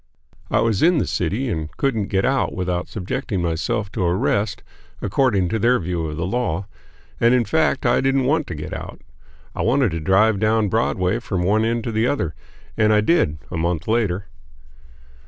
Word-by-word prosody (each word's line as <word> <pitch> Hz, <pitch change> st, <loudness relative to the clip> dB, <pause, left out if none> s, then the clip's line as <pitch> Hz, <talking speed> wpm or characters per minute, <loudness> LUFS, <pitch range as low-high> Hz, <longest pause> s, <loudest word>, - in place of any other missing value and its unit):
I -, -, +2 dB
was 110 Hz, -4 st, +1 dB
in 175 Hz, +1 st, +4 dB
the -, -, +1 dB
city 105 Hz, +10 st, -1 dB
and 80 Hz, -8 st, -3 dB
couldn't 115 Hz, -8 st, 0 dB
get 95 Hz, -1 st, 0 dB
out 135 Hz, 0 st, +1 dB
without 90 Hz, -1 st, -2 dB
subjecting 95 Hz, 0 st, -3 dB
myself 85 Hz, +6 st, -1 dB
to 110 Hz, -, -2 dB
arrest, 100 Hz, +4 st, 0 dB, 0.4 s
according 105 Hz, -3 st, +1 dB
to 110 Hz, -, -1 dB
their 120 Hz, +4 st, +3 dB
view 85 Hz, -2 st, -2 dB
of 75 Hz, 0 st, -6 dB
the 85 Hz, -, -2 dB
law; 100 Hz, -4 st, -1 dB, 0.5 s
and 120 Hz, +2 st, +4 dB
in 120 Hz, -2 st, +2 dB
fact 160 Hz, -1 st, +1 dB
I 120 Hz, -, +3 dB
didn't 135 Hz, 0 st, +2 dB
want 155 Hz, +3 st, +1 dB
to 85 Hz, -, -5 dB
get 75 Hz, -, -6 dB
out. -, -, -7 dB, 0.5 s
I -, -, -3 dB
wanted 125 Hz, -2 st, +2 dB
to 85 Hz, -, -3 dB
drive 95 Hz, +5 st, +3 dB
down 110 Hz, 0 st, +2 dB
Broadway 110 Hz, -2 st, 0 dB
from 95 Hz, -7 st, -2 dB
one 105 Hz, +4 st, +2 dB
end 115 Hz, 0 st, 0 dB
to 115 Hz, -, -3 dB
the 110 Hz, +2 st, +1 dB
other, 85 Hz, -, -1 dB, 0.4 s
and 110 Hz, -1 st, +3 dB
I 105 Hz, 0 st, +4 dB
did, 105 Hz, -, +2 dB
a 90 Hz, -, -3 dB
month 85 Hz, +1 st, -1 dB
later. 105 Hz, -4 st, 0 dB
105 Hz, 190 wpm, -21 LUFS, 90-120 Hz, 0.5 s, in